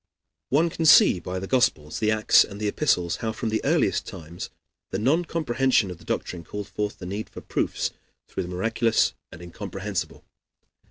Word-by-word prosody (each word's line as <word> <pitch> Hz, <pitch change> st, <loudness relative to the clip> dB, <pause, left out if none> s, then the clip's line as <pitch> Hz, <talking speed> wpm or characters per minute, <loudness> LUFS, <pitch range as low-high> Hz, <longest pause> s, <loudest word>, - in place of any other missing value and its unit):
One 160 Hz, +5 st, +3 dB
can 165 Hz, -, -2 dB
see 95 Hz, -, +7 dB
by 90 Hz, +2 st, -5 dB
the 95 Hz, -, -4 dB
Gospels, 120 Hz, -, +1 dB
the 110 Hz, -, +1 dB
Acts, 110 Hz, 0 st, +5 dB
and 100 Hz, -, -9 dB
the 105 Hz, -, -1 dB
Epistles 90 Hz, -, +1 dB
how 110 Hz, -, -2 dB
from 110 Hz, +1 st, -3 dB
the 110 Hz, 0 st, 0 dB
earliest -, -, +1 dB
times 85 Hz, +2 st, -8 dB, 0.4 s
the -, -, -2 dB
non 145 Hz, -, +2 dB
comprehension 130 Hz, -, +1 dB
of 90 Hz, -, -9 dB
the -, -, -16 dB
doctrine 85 Hz, -2 st, -3 dB
called 105 Hz, +4 st, -7 dB
forth 105 Hz, +2 st, -3 dB
the 90 Hz, -, -8 dB
need 100 Hz, +4 st, -5 dB
for -, -, -10 dB
proofs -, -, -1 dB, 0.4 s
through -, -, -4 dB
the 90 Hz, -, -5 dB
miraculous 115 Hz, +5 st, +1 dB, 0.2 s
and 85 Hz, -, -11 dB
incomprehensible. 85 Hz, -1 st, -5 dB
105 Hz, 180 wpm, -25 LUFS, 90-120 Hz, 0.4 s, see